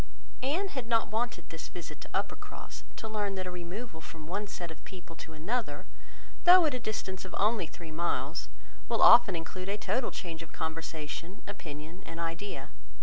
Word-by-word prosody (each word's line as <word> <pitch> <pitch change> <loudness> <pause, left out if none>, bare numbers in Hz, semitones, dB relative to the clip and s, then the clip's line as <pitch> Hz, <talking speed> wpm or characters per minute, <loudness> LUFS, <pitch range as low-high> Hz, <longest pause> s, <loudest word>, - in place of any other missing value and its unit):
Anne 335 +10 +1
had 260 -9 -3
not 230 -3 +3
wanted 235 +2 0
this - - -5
visit - - -7
to - - -8
Uppercross, - - -3
to 220 - -4
learn 205 -2 0
that 185 -1 -2
a 180 - -3
removal 180 +1 -5
from 160 -1 -9
one 200 +6 -1
set 175 -3 -5
of 160 - -11
people 175 -3 -9
to 160 - -8
another, 160 -1 -1 0.6
though 355 -1 +10
at 300 - +3
a 250 - 0
distance 195 -4 -2
of 185 - -6
only 210 -4 +3
three 165 +1 -9
miles, 145 -6 0 0.4
will 230 - +4
often 200 -6 +10
include 185 +3 -4
a 205 - +1
total 245 +3 +1
change 165 -3 -5
of 165 - -9
conversation, 160 +2 -4
opinion, 160 -2 -7
and 165 0 -6
idea. 165 -4 -3
185 Hz, 180 wpm, -32 LUFS, 165-220 Hz, 0.6 s, though